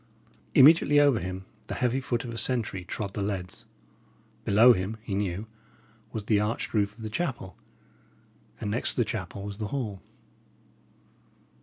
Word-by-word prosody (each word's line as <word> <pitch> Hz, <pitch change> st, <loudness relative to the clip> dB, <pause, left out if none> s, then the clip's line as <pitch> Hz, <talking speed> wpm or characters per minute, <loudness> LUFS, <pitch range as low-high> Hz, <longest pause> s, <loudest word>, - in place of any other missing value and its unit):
Immediately 145 Hz, +1 st, +7 dB
over 140 Hz, -6 st, +4 dB
him 95 Hz, +1 st, -5 dB, 0.2 s
the -, -, -4 dB
heavy 125 Hz, +1 st, +1 dB
foot 120 Hz, -3 st, -2 dB
of 120 Hz, -, -6 dB
a -, -, -6 dB
sentry 115 Hz, -7 st, -1 dB
trod 100 Hz, +2 st, -5 dB
the 105 Hz, -, -3 dB
leads. 95 Hz, -3 st, -4 dB, 0.8 s
Below 115 Hz, +5 st, +7 dB
him, 95 Hz, +3 st, -3 dB
he 105 Hz, -, -5 dB
knew, 100 Hz, 0 st, -2 dB, 0.7 s
was 110 Hz, -, -4 dB
the 105 Hz, 0 st, +2 dB
arched 105 Hz, +2 st, -2 dB
roof 100 Hz, -1 st, +1 dB
of 115 Hz, -, -11 dB
the -, -, -3 dB
chapel; 120 Hz, -, -3 dB, 1.0 s
and 105 Hz, -, -3 dB
next 120 Hz, -, 0 dB
to -, -, -21 dB
the 120 Hz, -, +2 dB
chapel 100 Hz, -2 st, -5 dB
was 100 Hz, +1 st, -7 dB
the 105 Hz, -, -2 dB
hall. 105 Hz, -7 st, -4 dB
105 Hz, 160 wpm, -27 LUFS, 100-120 Hz, 1.0 s, Immediately